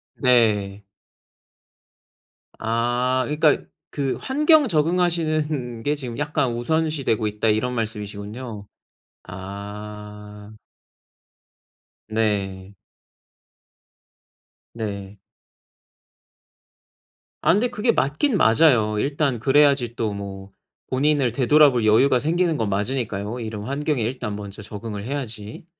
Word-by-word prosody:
네. 105 Hz, -6 st, +2 dB, 1.8 s
아 120 Hz, +3 st, 0 dB
그니까 150 Hz, 0 st, +3 dB, 0.3 s
그 135 Hz, -3 st, -2 dB
"환경 300 Hz, +2 st, +4 dB
적응하시는 155 Hz, -, 0 dB
게 145 Hz, +1 st, +1 dB
지금 125 Hz, -5 st, -7 dB
약간 145 Hz, -3 st, 0 dB
우선시되고 140 Hz, -3 st, 0 dB
있다." 105 Hz, +1 st, -1 dB
이런 110 Hz, +4 st, +1 dB
말씀이시군요. 105 Hz, 0 st, -5 dB, 0.6 s
아. 105 Hz, +2 st, -9 dB, 1.6 s
네. 100 Hz, -3 st, -1 dB, 2.0 s
네. 100 Hz, -3 st, -6 dB, 2.2 s
아 -, -, +4 dB
근데 215 Hz, +6 st, +2 dB
그게 230 Hz, +2 st, +1 dB
맞긴 200 Hz, -, +1 dB
맞아요. 115 Hz, -, +4 dB
일단 140 Hz, -1 st, 0 dB
그래야지 135 Hz, -2 st, +3 dB
또 110 Hz, -3 st, -1 dB
뭐 100 Hz, -1 st, -7 dB, 0.4 s
본인을 140 Hz, -1 st, +2 dB
되돌아 140 Hz, +4 st, +5 dB
볼 120 Hz, -3 st, 0 dB
여유가 125 Hz, +4 st, +4 dB
생기는 165 Hz, +3 st, +1 dB
건 110 Hz, -6 st, -1 dB
맞으니까요 105 Hz, +1 st, -2 dB
이런 110 Hz, -3 st, -5 dB
환경에 140 Hz, +2 st, -1 dB
일단 110 Hz, -3 st, -3 dB
먼저 100 Hz, 0 st, -8 dB
적응을 105 Hz, 0 st, -7 dB
해야지. 115 Hz, -3 st, -6 dB
120 Hz, 205 characters per minute, -23 LUFS, 105-145 Hz, 2.2 s, 되돌아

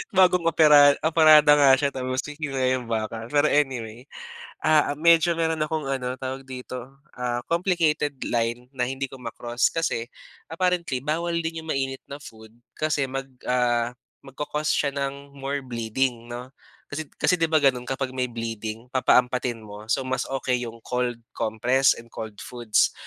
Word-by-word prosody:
Bagong 180 Hz, -2 st, +4 dB
opera 150 Hz, -3 st, +7 dB
operada 155 Hz, -2 st, +6 dB
nga 140 Hz, -2 st, +7 dB
siya 140 Hz, +1 st, 0 dB
tapos 130 Hz, 0 st, -3 dB
ngunguya 135 Hz, -4 st, -1 dB
ng 120 Hz, -, -10 dB
baka. 110 Hz, 0 st, -3 dB
Pero 145 Hz, +3 st, +2 dB
anyway, 125 Hz, -4 st, -1 dB, 0.5 s
ah, 155 Hz, -2 st, +3 dB
medyo 170 Hz, +3 st, +4 dB
meron 160 Hz, -1 st, 0 dB
akong 155 Hz, -2 st, -3 dB
ano 130 Hz, -2 st, -2 dB
tawag 130 Hz, 0 st, -5 dB
dito, 130 Hz, +1 st, -8 dB, 0.2 s
ah, 120 Hz, -1 st, -2 dB
complicated 165 Hz, -4 st, +1 dB, 0.2 s
line 120 Hz, +1 st, -1 dB
na 125 Hz, -, +1 dB
hindi 135 Hz, +2 st, -3 dB
ko 135 Hz, -, -11 dB
ma-cross. 120 Hz, 0 st, -1 dB
Kasi 160 Hz, -8 st, -1 dB, 0.5 s
apparently 170 Hz, -6 st, 0 dB
bawal 170 Hz, +4 st, -1 dB
din 165 Hz, 0 st, -4 dB
yung 160 Hz, -, -6 dB
mainit 135 Hz, -1 st, -2 dB
na 140 Hz, +1 st, -9 dB
food 110 Hz, -4 st, -13 dB, 0.2 s
kasi 150 Hz, -3 st, 0 dB
mag 135 Hz, +1 st, -4 dB, 0.2 s
ah, 120 Hz, -1 st, +1 dB, 0.3 s
magco-cause 150 Hz, +3 st, -3 dB
siya 140 Hz, -1 st, 0 dB
ng 140 Hz, 0 st, -5 dB
more 140 Hz, 0 st, -4 dB
bleeding, 120 Hz, 0 st, -2 dB
'no? 125 Hz, +2 st, -8 dB, 0.4 s
Kasi, 155 Hz, 0 st, -4 dB
kasi 180 Hz, -2 st, +2 dB
'di 165 Hz, -, +2 dB
ba 160 Hz, -, +2 dB
ganun 130 Hz, -4 st, +2 dB
kapag 135 Hz, -1 st, -2 dB
may 130 Hz, -1 st, -1 dB
bleeding 115 Hz, -1 st, -5 dB
papaampatin 125 Hz, -2 st, +2 dB
mo. 105 Hz, +1 st, -11 dB
So 130 Hz, +3 st, +1 dB
mas 130 Hz, 0 st, -2 dB
okey 130 Hz, -2 st, -1 dB
'yong 115 Hz, -1 st, -6 dB
cold 125 Hz, -1 st, -1 dB, 0.2 s
compress 120 Hz, +4 st, +2 dB
and 115 Hz, 0 st, -13 dB
cold 110 Hz, -2 st, -7 dB
foods. 120 Hz, -3 st, 0 dB
135 Hz, 160 wpm, -25 LUFS, 120-150 Hz, 0.5 s, opera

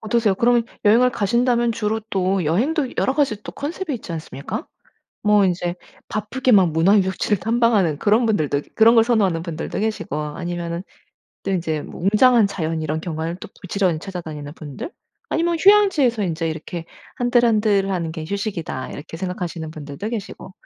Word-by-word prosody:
어떠세요? 215 Hz, -2 st, +1 dB
그러면 235 Hz, +2 st, +3 dB, 0.2 s
여행을 240 Hz, +4 st, +5 dB
가신다면 235 Hz, +2 st, +1 dB
주로 220 Hz, 0 st, -1 dB
또 190 Hz, -2 st, +1 dB
여행도 255 Hz, -, +1 dB
여러 265 Hz, -, +2 dB
가지 245 Hz, -8 st, 0 dB
또 -, -, -8 dB
컨셉이 310 Hz, +1 st, -4 dB
있지 205 Hz, -7 st, -7 dB
않습니까? 155 Hz, -3 st, -6 dB, 0.6 s
뭐 210 Hz, -1 st, +4 dB
인제 175 Hz, -1 st, -1 dB, 0.3 s
바쁘게 245 Hz, +5 st, -1 dB
막 185 Hz, -5 st, +5 dB
문화 170 Hz, +6 st, +4 dB
유적지를 190 Hz, +1 st, +1 dB
탐방하는 220 Hz, -7 st, +2 dB
그런 215 Hz, +3 st, +3 dB
분들도 155 Hz, -10 st, +1 dB
그런 230 Hz, +1 st, +6 dB
걸 225 Hz, -, +7 dB
선호하는 195 Hz, -8 st, +1 dB
분들도 165 Hz, +2 st, -4 dB
계시고 215 Hz, -7 st, -2 dB
아니면은 170 Hz, +3 st, -4 dB, 0.6 s
또 195 Hz, -, -3 dB
인제 165 Hz, -5 st, -1 dB
뭐 -, -, -10 dB
웅장한 220 Hz, +3 st, +5 dB
자연 160 Hz, -4 st, -3 dB
이런 155 Hz, +1 st, -2 dB
경관을 165 Hz, 0 st, -4 dB
또 -, -, -8 dB
부지런히 185 Hz, -3 st, 0 dB
찾아다니는 155 Hz, -6 st, -7 dB
분들 150 Hz, -, -7 dB, 0.4 s
아니면 335 Hz, +1 st, +1 dB
휴양지에서 355 Hz, -, +4 dB
인제 165 Hz, -3 st, -1 dB
이렇게 160 Hz, +1 st, -5 dB, 0.3 s
'한들한들하는 210 Hz, -8 st, +2 dB
게 160 Hz, -1 st, -6 dB
휴식이다.' 195 Hz, -, -4 dB
이렇게 160 Hz, +2 st, -8 dB
생각하시는 175 Hz, -3 st, -4 dB
분들도 155 Hz, +6 st, -6 dB
계시고 205 Hz, -4 st, -6 dB
195 Hz, 400 characters per minute, -21 LUFS, 165-230 Hz, 0.6 s, 걸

